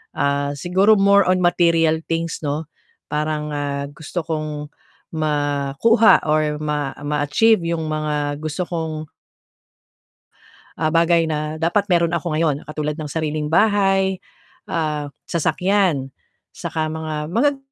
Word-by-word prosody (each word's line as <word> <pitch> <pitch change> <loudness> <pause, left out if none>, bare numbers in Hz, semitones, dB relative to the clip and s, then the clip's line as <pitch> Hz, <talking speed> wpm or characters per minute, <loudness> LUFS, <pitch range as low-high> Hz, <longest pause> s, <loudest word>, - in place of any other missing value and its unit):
ah, 140 0 0
siguro 190 +8 +3
more 200 -1 +4
on 185 0 +2
material 165 -2 +3
things, 165 0 -2
'no. 145 +3 -1 0.5
Parang 150 0 -2
ah, 140 -1 -2
gusto 160 +4 -5
kong 155 -2 -4 0.4
makuha 150 - +3
or 150 -1 +1
ma 150 -2 -2
ma-achieve 150 +9 +3
'yong 165 -1 -2
mga 150 -1 -2
gusto 155 +3 -3
kong 160 -2 -4 1.7
ah, 155 -1 +1
bagay 170 0 +4
na 155 0 -2
dapat 175 +6 0
mayro'n 170 -2 +2
ako 170 -2 -2
ngayon, 155 -3 +2
katulad 150 0 -3
ng 150 - -4
sariling 155 0 -2
bahay, 195 +1 +2 0.5
ah, 150 -3 -2 0.2
sasakyan 175 -4 +1 0.4
saka 155 -1 -3
mga 160 -1 -4 0.2
magag 280 +6 +2
155 Hz, 120 wpm, -21 LUFS, 150-175 Hz, 1.7 s, more